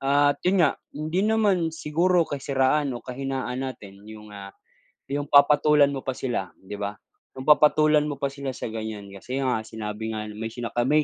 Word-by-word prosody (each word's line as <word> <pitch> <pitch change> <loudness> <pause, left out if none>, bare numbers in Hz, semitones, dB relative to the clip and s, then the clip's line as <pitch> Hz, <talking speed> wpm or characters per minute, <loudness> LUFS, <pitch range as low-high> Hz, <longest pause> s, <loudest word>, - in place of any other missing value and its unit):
at 145 +1 +2
yun 180 -2 +4
nga, 145 - 0 0.2
hindi 155 +5 -1
naman 205 -5 +2
siguro 170 +3 +1
kasiraan 140 0 0
o - - -11
kahinaan 130 0 -4
natin 105 -7 -7
yung, 105 -1 -11
ah, 100 -1 -9 0.6
yung 145 +1 -2
papatulan 145 0 +5
mo 135 - -3
pa 130 -1 -4
sila 120 -9 -3
di 100 +2 -9
ba? 100 0 -3 0.4
Yung 130 - -5
papatulan 150 +1 +5
mo 145 - -3
pa 140 0 -2
sila 140 -2 -5
sa - - -6
ganyan 110 -3 -6
kasi 125 +8 -4
nga 125 -3 +1
sinabi 110 0 -5
nga 105 0 -5
may 110 +2 -5
sina 120 0 -6
kami 145 +6 +2
135 Hz, 180 wpm, -25 LUFS, 110-150 Hz, 0.6 s, papatulan